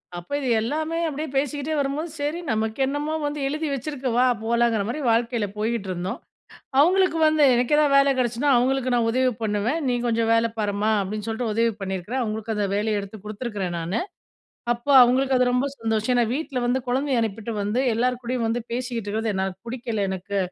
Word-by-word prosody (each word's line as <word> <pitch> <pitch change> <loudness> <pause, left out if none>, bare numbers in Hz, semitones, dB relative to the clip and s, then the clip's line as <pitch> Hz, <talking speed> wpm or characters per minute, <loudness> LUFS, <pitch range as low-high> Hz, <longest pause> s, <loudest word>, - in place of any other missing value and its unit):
அப்ப 175 0 -8
இது 265 - -2
எல்லாமே 310 +8 -2
அப்படியே 305 +1 -4
பேசிக்கிட்டே 290 +2 -1
வரும்போது, 285 +4 -2
சரி 295 +4 -2
நமக்கு 220 +1 -1
என்னமோ 290 +3 -2
வந்து, 290 0 -2
எழுதி 310 +3 -2
வச்சுருக்கு. 270 0 -3
வா 250 - +5 0.2
போலாங்கிற 235 -2 +2
மாரி 240 +7 -3
வாழ்க்கையில 230 -1 +1
போய்கிட்டுருந்தோம். 195 -5 -2 0.6
அவுங்களுக்கு 365 +2 +4
வந்து, 310 -1 +3
எனக்கு 245 +4 +2
ஏதாவது 295 -2 +3
வேலை 275 0 +5
கெடைச்சினா, 245 +3 0
அவுங்களுக்கு 255 +1 +1
நான் 235 -1 +2
உதவி 255 +1 +2
பண்ணுவேன். 215 +8 0
நீ 245 - +1
கொஞ்ச 230 -1 +1
வேல 230 0 +3
பாரும்மா. 205 +1 0
அப்படின்னு 210 +2 -4
சொல்லிட்டு, 225 0 -2
உதவி 230 +1 +2
பண்ணியிருக்குறேன். 190 +6 -3
அவுங்களுக்கு 220 0 -3
அந்த 205 -1 0
வேலய 210 0 0
எடுத்து 200 +2 -9
குடுத்துருக்கிறேன் 210 -4 -4
நானு. 170 +6 -2 0.7
அப்ப 240 +1 -8 0.2
அவுங்களுக்கு 260 +2 +3
அது 250 - +4
ரொம்ப 250 +2 +1
சந்தோஷம். 225 +1 0
ஏன்னா, 240 -1 +3
வீட்ல 290 -2 -3
வந்து 245 +2 +2
கொழந்தய 265 +1 +1
அனுப்பிட்டு 225 +1 -3
வந்து, 210 +5 0
எல்லார் 250 +2 0
கூடயும் 240 -1 -1
வந்து 235 +1 -1
பேசிகிட்டு 240 -3 -3
இருக்குறது, 220 +1 -1
என்னால 190 0 -1
பிடிக்கல 230 -4 -2
எனக்கு. 190 +2 -3
235 Hz, 175 wpm, -24 LUFS, 215-270 Hz, 0.7 s, வா